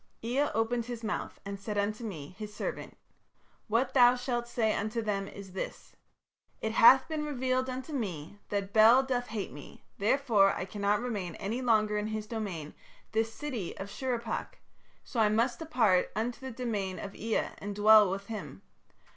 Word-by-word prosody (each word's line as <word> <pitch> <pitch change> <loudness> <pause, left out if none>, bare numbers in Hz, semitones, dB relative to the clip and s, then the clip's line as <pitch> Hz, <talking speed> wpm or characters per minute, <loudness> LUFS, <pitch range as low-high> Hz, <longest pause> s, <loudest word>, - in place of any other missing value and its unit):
"Ea 260 +6 +1
opened 225 +1 0
his 240 -1 -6
mouth 215 - -3
and 200 0 -5
said 205 +1 -4
unto 210 +3 -1
me, 165 -8 -6
his 210 -1 -6
servant: 210 - -5 0.7
'What 235 +4 +1
thou 245 -1 +7
shalt 245 -1 -2
say 225 -2 +1
unto 215 +3 -2
them 205 -3 -1
is 195 -1 -10
this.... 190 - -6 0.7
_It 220 - 0
hath 260 +4 +7
been 315 -2 -2
revealed 260 -3 -1
unto 260 +4 -5
me 195 - -4
that 200 -1 -2
Bel 225 +4 +7
doth 250 -2 -1
hate 215 - -4
me, 145 +2 -12 0.2
therefore 210 -3 +4
I 180 - -3
cannot 205 +2 0
remain 205 -9 -3
any 225 +6 -3
longer 215 -3 +2
in 210 - -2
his 215 -1 -3
domain, 200 -9 -5 0.4
this 225 +1 0
city 240 - -5
of 195 +1 -6
Shurippak, 240 -3 -3 0.5
so 240 - -4
I 215 -1 +5
must 230 +3 +1
depart 240 - +2
unto 235 +2 -2
the 265 -1 -6
domain 220 -6 -3
of 200 - -7
Ea 225 0 -1
and 205 0 -5
dwell 210 -1 +7
with 195 +1 -4
him.... 190 - -7
220 Hz, 170 wpm, -30 LUFS, 200-245 Hz, 0.7 s, thou